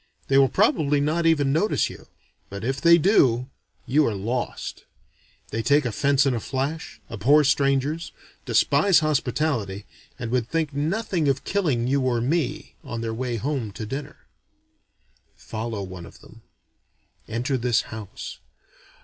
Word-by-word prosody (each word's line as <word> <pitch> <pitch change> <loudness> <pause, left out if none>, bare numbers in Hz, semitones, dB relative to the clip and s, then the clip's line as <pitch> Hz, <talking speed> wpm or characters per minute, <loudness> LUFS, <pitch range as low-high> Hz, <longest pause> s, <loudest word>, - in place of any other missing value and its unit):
They 135 - +4
will 135 -1 +5
probably 145 +2 +2
not 160 +4 +1
even 145 -4 +3
notice 175 +8 +2
you; - - -11 0.4
but 100 +1 -7
if 135 +4 -2
they 170 +2 +7
do, 135 - +3 0.3
you 150 +5 +3
are 110 - -1
lost. 115 +6 -4 0.7
They 115 - -1
take 145 +4 +3
offense 140 +4 +2
in 135 - +2
a 120 - -1
flash, 140 +7 -4
abhor 135 +8 +4
strangers, 140 +3 +1 0.3
despise 190 -5 +3
hospitality, 125 -9 -1 0.3
and 120 -3 -5
would 125 -1 0
think 160 -3 -1
nothing 165 +3 -1
of 140 0 +1
killing 150 -12 0
you 135 +2 +1
or 125 -2 +1
me 150 +3 -1
on 115 -1 -5
their 115 -1 -3
way 120 +1 -3
home 125 -2 -2
to 110 - -6
dinner. 135 +7 -7 1.1
Follow 110 -2 -5
one 90 -2 -8
of - - -16
them. - - -16 0.9
Enter 120 +5 -1
this 120 -2 +2
house. 110 -3 -8
135 Hz, 145 wpm, -24 LUFS, 115-150 Hz, 1.1 s, they